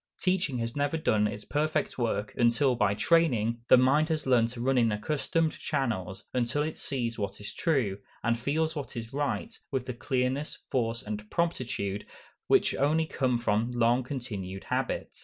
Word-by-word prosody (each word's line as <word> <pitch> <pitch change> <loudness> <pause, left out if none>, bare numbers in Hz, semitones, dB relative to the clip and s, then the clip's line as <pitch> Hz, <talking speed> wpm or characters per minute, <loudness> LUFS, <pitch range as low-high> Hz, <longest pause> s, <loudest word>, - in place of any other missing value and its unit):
Teaching 180 -8 +1
has 115 0 -3
never 145 +2 0
done 110 -9 +2
its 105 0 -6
perfect 155 +1 0
work, 105 -3 -1
until, 120 +2 +3
by 105 -3 +2
training, 120 -7 +2
the - - +8
mind 140 +5 +4
has 160 -1 -1
learned 120 -3 +4
to 120 0 -8
run 130 +3 +1
in 115 -2 +3
accustomed 155 +8 0
channels, 95 -6 -2
until 125 +4 +1
it 155 +1 -3
sees 120 -5 -3
what 100 -1 -3
is 105 - -7
true, 125 - 0 0.2
and 115 0 +1
feels 160 +6 0
what 140 -4 -5
is 115 +1 -6
right, 145 +11 -2
with 130 -2 -2
the 130 - -4
clearness, 130 +3 -1
force, 115 -2 0
and 105 0 -6
promptitude, 120 - -1 0.4
which - - +4
come - - 0
only 160 +3 +3 0.3
from 115 0 +1
long 120 +1 +3
continued 105 -8 -5
habit. - - -2
125 Hz, 170 wpm, -29 LUFS, 110-145 Hz, 0.4 s, the